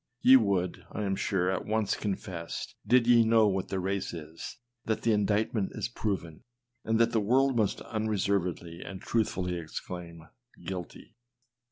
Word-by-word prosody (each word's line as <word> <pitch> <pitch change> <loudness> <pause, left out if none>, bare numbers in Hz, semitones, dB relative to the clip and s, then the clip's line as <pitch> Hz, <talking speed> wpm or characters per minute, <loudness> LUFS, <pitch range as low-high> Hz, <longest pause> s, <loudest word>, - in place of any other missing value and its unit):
Ye 130 - +9
would, 100 -7 +2
I 105 - -3
am 95 -1 0
sure, 95 -2 0
at 95 - -2
once 110 -1 +1
confess, 95 -4 -4
did 125 -1 +5
ye 120 -1 +6
know 110 -1 +5
'what 95 -2 0
the 95 - -2
race 95 -1 -2
is, 80 +5 -8 0.3
that 110 - -1
the 115 - +3
indictment 105 0 +1
is - - -2
proven, 95 -9 -3 0.4
and 110 0 +1
that 115 - +4
the 110 - +2
world 130 +5 +3
must 110 -4 +1
unreservedly 95 -6 -1
and 95 -1 -7
truthfully 90 -6 -1
exclaim, 85 0 -7 0.2
" 120 - -21
guilty." 90 -2 -6
100 Hz, 160 wpm, -29 LUFS, 90-110 Hz, 0.4 s, Ye